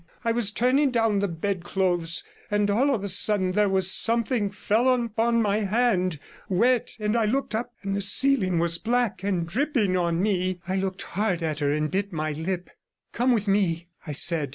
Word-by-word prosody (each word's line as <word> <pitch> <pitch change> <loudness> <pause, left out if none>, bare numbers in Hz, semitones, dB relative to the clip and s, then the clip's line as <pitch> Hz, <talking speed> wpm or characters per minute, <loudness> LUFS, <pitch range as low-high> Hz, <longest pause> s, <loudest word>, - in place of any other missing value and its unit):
'I 230 - +2
was 230 -3 +1
turning 255 +6 +2
down 225 -4 +1
the 200 - 0
bed 180 +1 -3
clothes, 175 -3 0 0.3
and 205 0 +1
all 260 +8 +2
of 205 - -5
a - - -2
sudden 190 0 +3
there 205 +1 +2
was 190 -1 +3
something 230 -2 +2
fell 215 +5 0
upon 230 -1 +1
my 205 0 +1
hand, 200 -5 0 0.3
wet, 235 +6 +1
and 210 +1 -1
I 230 -2 +2
looked 255 +1 -1
up, 240 +2 -3
and 195 0 -2
the 200 - -1
ceiling 200 -3 +2
was 165 0 0
black 240 -3 -1
and 190 -4 -1
dripping 220 - 0
on 170 -2 0
me.' 185 -2 0
I 190 - -1
looked 190 0 -2
hard 190 -3 -2
at 155 -2 -2
her 145 -1 0
and 150 +1 -1
bit 200 +2 -2
my 155 -2 -3
lip. 175 +4 -4 0.4
'Come 250 +2 +1
with 220 -4 0
me,' 175 -4 0 0.2
I 150 - -4
said. 155 -1 +2
200 Hz, 195 wpm, -25 LUFS, 180-230 Hz, 0.4 s, sudden